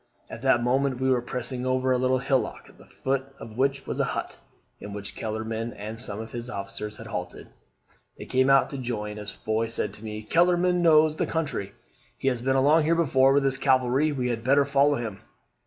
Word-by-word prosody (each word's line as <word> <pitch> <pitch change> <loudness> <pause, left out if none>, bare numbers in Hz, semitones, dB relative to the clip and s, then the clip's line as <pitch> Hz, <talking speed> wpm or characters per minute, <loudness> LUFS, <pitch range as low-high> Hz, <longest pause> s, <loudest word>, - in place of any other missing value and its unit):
At 110 - -8
that 130 -2 +3
moment 130 +1 +1
we 130 0 +2
were 125 -2 +2
passing 125 +1 -3
over 130 0 +1
a 130 - +3
little 130 +1 +2
hillock, 130 0 -1
at - - -20
the - - -17
foot 135 0 -3
of 115 -1 -10
which 135 +2 0
was - - -4
a - - +3
hut, - - -4 0.4
in 105 - -8
which 100 0 -6
Kellerman 110 +1 -4
and 110 +2 -6
some 105 -4 -2
of 110 0 -7
his 120 0 -5
officers 105 0 -6
had - - -10
halted. 90 0 -6 0.7
They - - -8
came 130 +1 +2
out 135 0 +4
to 140 - -5
join 105 -4 -4
as 105 -1 -6
Foy 110 +1 -2
said 115 - -2
to 105 - -12
me, 105 0 -6
'Kellerman 175 +5 +3
knows 155 -2 +5
the - - 0
country: 150 -12 -3 0.4
he 135 - +1
has 125 -3 -2
been 135 +2 +1
along 145 +5 +5
here 165 +2 +3
before 135 -5 +4
with 140 0 +3
his 135 -1 +1
cavalry; 130 +2 +2
we 125 -3 -1
had 115 -2 -3
better 140 +3 +4
follow 140 +1 +3
him.' 115 -6 -5
130 Hz, 215 wpm, -26 LUFS, 110-135 Hz, 0.7 s, knows